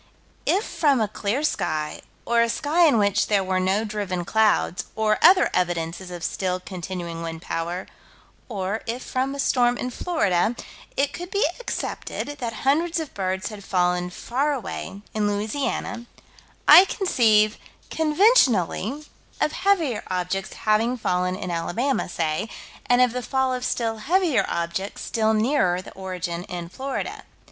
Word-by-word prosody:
If 400 - +3
from 285 -5 +2
a 215 - +1
clear 215 +7 -2
sky, 155 - -1 0.2
or 235 0 +3
a 235 - +2
sky 320 +7 +3
in 280 - +4
which 205 -1 +2
there 200 -2 +2
were 185 0 0
no 190 +4 +1
driven 200 -4 -3
clouds, 220 -4 +2
or 215 -1 +1
other 365 +3 +6
evidences 175 0 -1
of 175 -2 -7
still 185 +1 -1
continuing 175 -2 -6
wind 165 0 -6
power 170 +3 -3 0.6
or, 205 0 -2
if 240 +3 -3
from 265 +2 -2
a - - -7
storm 245 -2 +2
in 250 - -3
Florida, 225 - +1 0.4
it 280 0 +1
could 355 +1 -6
be 405 +4 +1
accepted - - -4
that 235 -2 -2
hundreds 330 +5 +2
of 315 -3 -6
birds 190 0 -2
had 210 -2 -9
fallen 180 -1 +1
far 270 +10 -1
away, 200 -4 -6
in 210 -1 +1
Louisiana, 220 +3 -2 0.6
I 370 - +10
conceive, 220 - +3 0.3
conventionally, 300 - +3 0.3
of 305 - +2
heavier 335 - +1
objects 185 +1 -2
having 225 +4 +1
fallen 180 -4 0
in 185 -1 -5
Alabama, 215 +12 -1
say, 165 +4 -1 0.4
and 245 0 +4
of 245 -2 +1
the 250 - -2
fall 265 0 0
of 250 0 -3
still 225 -3 -1
heavier 335 - +2
objects 170 +4 -3
still 220 -1 +1
nearer 215 -6 +2
the 185 - -10
origin 180 -2 -4
in 175 -3 -6
Florida. 265 +8 -4
215 Hz, 150 wpm, -24 LUFS, 185-265 Hz, 0.6 s, I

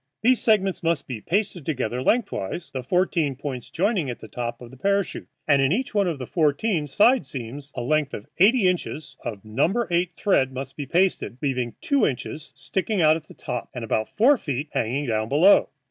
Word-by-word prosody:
These 250 +1 +4
segments 195 -4 +2
must 165 -3 0
be 120 -5 -5
pasted 185 - -1
together 125 -5 -2
lengthwise, 170 - -1
the 130 - -4
fourteen 160 0 +1
points 130 -3 -6
joining 190 - 0
at 120 - -4
the - - -11
top 120 +2 -4
of 120 -1 -11
the 130 - -13
parachute, 200 +5 -1 0.2
and 140 -2 +4
in 135 +1 +2
each 245 +8 -1
one 200 -3 +2
of 165 -4 -1
the 130 - -5
fourteen 155 - +1
side 230 - +4
seams 135 +3 -7
a 125 - -3
length 150 +2 0
of 105 - -8
eighty 210 +2 +5
inches 155 -6 -2
of 105 -2 -6
No. 160 - +1
8 170 0 +1
thread 135 -10 +2
must 135 +1 -6
be 145 -2 -5
pasted, 175 -7 +1
leaving 125 -4 -2
two 280 -2 +2
inches 150 +3 -5
sticking 200 +1 -2
out 155 0 +6
at 160 -1 -7
the - - -14
top 120 -1 -5
and 125 - -4
about 110 0 -1
four 255 +5 +5
feet 145 0 -3
hanging 130 +6 -1
down 110 -2 -1
below. 165 +8 +5
150 Hz, 200 wpm, -24 LUFS, 130-190 Hz, 0.2 s, out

